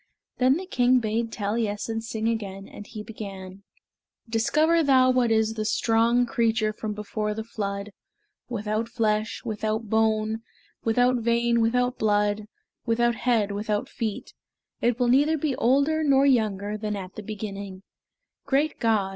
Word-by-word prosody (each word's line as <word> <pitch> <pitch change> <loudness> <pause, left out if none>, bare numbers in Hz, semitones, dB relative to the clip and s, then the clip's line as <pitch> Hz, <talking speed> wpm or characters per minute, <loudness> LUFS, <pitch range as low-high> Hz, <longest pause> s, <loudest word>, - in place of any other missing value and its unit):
Then 260 +3 +4
the 375 - -6
king 255 -7 +3
bade 225 0 -1
Taliessin 220 +1 -2
sing 225 0 -3
again, 200 -4 -3
and 205 - -11
he 215 -2 -7
began: 195 -3 -8 0.7
"Discover 305 +9 +2
thou 260 -3 +5
what 250 -2 +2
is 220 0 +2
The 215 -1 -3
strong 230 +3 +2
creature 225 -2 +1
from 215 0 -4
before 210 0 -3
the 220 - -4
flood, 200 -2 -4 0.6
Without 215 0 -2
flesh, 215 -2 -1
without 215 0 -2
bone, 220 0 +1 0.4
Without 245 +2 +3
vein, 235 0 +2
without 245 +2 +1
blood, 210 0 +1 0.4
Without 240 0 +2
head, 225 -3 +1
without 210 +1 -2
feet; 220 -3 -5 0.5
It 240 +1 +1
will 245 - +2
neither 290 +6 +4
be 290 -2 -1
older 280 +6 +2
nor 275 -2 +4
younger 215 -5 +1
Than 210 -1 -2
at 190 -2 -7
the - - -7
beginning; 200 -2 -7 0.6
Great 285 +3 +1
God! 215 -4 +2
225 Hz, 145 wpm, -25 LUFS, 210-245 Hz, 0.7 s, thou